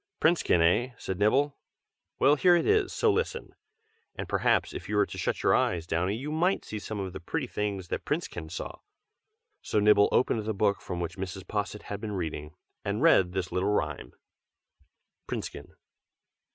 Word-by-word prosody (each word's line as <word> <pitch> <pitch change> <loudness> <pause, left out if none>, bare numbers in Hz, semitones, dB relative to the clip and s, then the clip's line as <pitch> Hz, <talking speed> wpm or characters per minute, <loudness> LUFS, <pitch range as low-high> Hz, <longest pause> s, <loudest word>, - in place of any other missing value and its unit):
"'Princekin,' 160 - +3
eh?" 120 +9 +2
said 95 -1 -5
Nibble, 135 +8 +2 0.6
"Well, 140 +2 +5
here 175 +4 +5
it 170 - +1
is, 420 -3 +3
so 450 - +2
listen! 465 +2 -2 0.6
And - - -5
perhaps, - - +1
if - - -7
you 105 - -1
were 105 0 +4
to - - -9
shut - - -1
your - - +4
eyes, 85 -3 +1
Downy, 90 +4 0
you 140 +6 -5
might 175 +5 +1
see 105 - -5
some 105 0 -5
of 95 -2 -4
the 95 - -6
pretty 135 - -3
things 100 -6 -3
that - - -3
Princekin 80 -2 -3
saw." - - -6 0.8
So 105 - 0
Nibble 105 0 +5
opened 115 -3 +2
the 110 - -1
book, 100 -1 +1
from 90 -2 -5
which 85 +2 -5
Mrs. 95 -1 -5
Posset 105 0 -3
had 100 0 -6
been 110 -2 -4
reading, 80 -4 -4 0.3
and 105 +7 -1
read 95 - +5
this 95 -2 -2
little 95 +2 0
rhyme: 105 - -2 1.2
_PRINCEKIN. - - -5
105 Hz, 180 wpm, -28 LUFS, 90-130 Hz, 1.2 s, Well